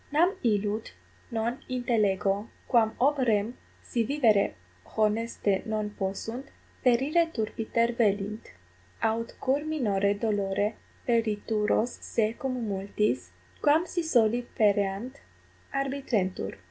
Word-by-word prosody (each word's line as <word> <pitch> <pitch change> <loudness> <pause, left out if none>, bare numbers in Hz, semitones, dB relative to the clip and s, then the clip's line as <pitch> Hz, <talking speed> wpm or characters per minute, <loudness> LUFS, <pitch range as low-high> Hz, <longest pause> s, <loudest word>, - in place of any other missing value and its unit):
Nam 345 +7 +3
illud 210 -1 0 0.4
non 235 +1 -1
intellego, 210 -4 +1 0.2
quam 225 -3 +3
ob 285 +3 +3
rem, 225 -2 +1 0.3
si 235 - 0
vivere 225 - +3 0.4
honeste 215 -2 +1
non 215 -1 -1
possunt, 210 +6 -4 0.4
perire 275 +7 +4
turpiter 230 -1 0
velint, 210 -2 0 0.5
aut 230 +1 0
cur 270 +2 +2
minore 205 -10 +1
dolore 205 -1 0 0.3
perituros 220 0 +1
se 220 -1 0
cum 250 -2 -3
multis, 195 - -1 0.3
quam 305 +4 +4
si 350 0 -2
soli 240 -7 +3 0.2
pereant, 205 +4 +1 0.5
arbitrentur. 260 - -1
225 Hz, 100 wpm, -28 LUFS, 205-250 Hz, 0.5 s, perire